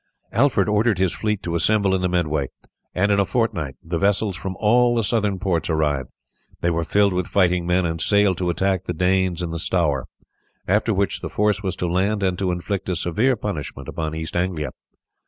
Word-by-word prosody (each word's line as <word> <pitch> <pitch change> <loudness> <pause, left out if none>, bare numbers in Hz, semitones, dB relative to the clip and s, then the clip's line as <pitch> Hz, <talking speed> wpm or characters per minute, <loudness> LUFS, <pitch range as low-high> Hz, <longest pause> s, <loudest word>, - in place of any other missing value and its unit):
Alfred 120 -9 +2
ordered 105 0 +2
his 95 -1 +1
fleet 105 -2 -2
to 85 - -3
assemble 100 +3 +2
in 95 - +1
the 90 - +1
Medway, 80 -6 0 0.5
and 100 +3 +2
in 100 - +3
a - - +5
fortnight 95 - -1
the 85 0 -3
vessels 100 0 +1
from 95 +2 -5
all 120 +3 +4
the 115 - +1
southern 105 -2 0
ports 90 -4 -1
arrived. 75 -5 0 0.5
They 85 - +1
were 85 0 0
filled 100 +3 +2
with 90 -1 -1
fighting 90 -3 +2
men, 90 +1 +2
and 80 -1 -2
sailed 100 -2 +3
to 90 -1 0
attack 95 +1 0
the 90 - -2
Danes 90 +1 +1
in 85 - -3
the 85 - -3
Stour, 75 -6 0 0.6
after 105 +4 +2
which 100 -4 0
the - - -4
force 105 -1 +1
was 95 -2 -2
to 90 - -2
land 100 +4 0
and 95 -1 +1
to 95 -2 0
inflict 95 +2 -3
a 90 - 0
severe 110 +11 +1
punishment 75 - -5
upon 80 -1 -4
East 80 +1 -5
Anglia. 85 -4 -1
95 Hz, 205 wpm, -22 LUFS, 85-100 Hz, 0.6 s, a